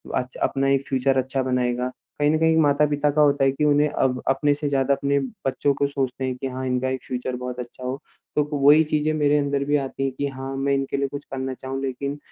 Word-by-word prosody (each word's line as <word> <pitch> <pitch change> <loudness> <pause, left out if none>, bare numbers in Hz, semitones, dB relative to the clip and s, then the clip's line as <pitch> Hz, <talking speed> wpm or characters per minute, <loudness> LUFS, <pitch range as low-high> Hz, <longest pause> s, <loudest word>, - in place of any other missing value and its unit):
अच 125 0 -3
अपना 135 0 +1
एक 135 0 +1
फ्यूचर 135 0 +1
अच्छा 130 +1 0
बनाएगा। 125 -1 0 0.3
कहीं 145 0 +3
न 155 - +2
कहीं 160 0 +3
माता-पिता 145 0 +2
का 150 +1 +2
होता 145 -1 +4
है 135 - +4
कि 135 +3 -3
उन्हें 145 0 +4
अब 125 -3 0
अपने 145 +2 +3
से 145 +1 -3
ज़्यादा 135 0 +2
अपने 140 +1 0 0.3
बच्चों 140 +1 +1
को 140 - +1
सोचते 135 -2 -2
हैं 130 -1 -2
कि 130 +2 -4
हाँ, 130 0 -5
इनका 130 +1 0
एक 130 0 -3
फ्यूचर 125 0 -3
बहुत 125 0 -5
अच्छा 125 +1 -8
हो। 130 +2 -3 0.4
तो 150 - +3
क 145 - -10
वही 145 +2 +6
चीज़ें 155 0 0
मेरे 150 -1 +3
अंदर 140 -1 0
भी 145 +1 +1
आती 135 -1 -3
है 135 - 0
कि 140 +2 -3
हाँ, 135 0 -6
मैं 140 +1 0
इनके 135 0 -1
लिए 140 0 0
कुछ 145 +1 -7
करना 130 0 -3
चाहूँ। 130 +1 -5
लेकिन 140 +2 -3
135 Hz, 245 wpm, -23 LUFS, 130-145 Hz, 0.4 s, वही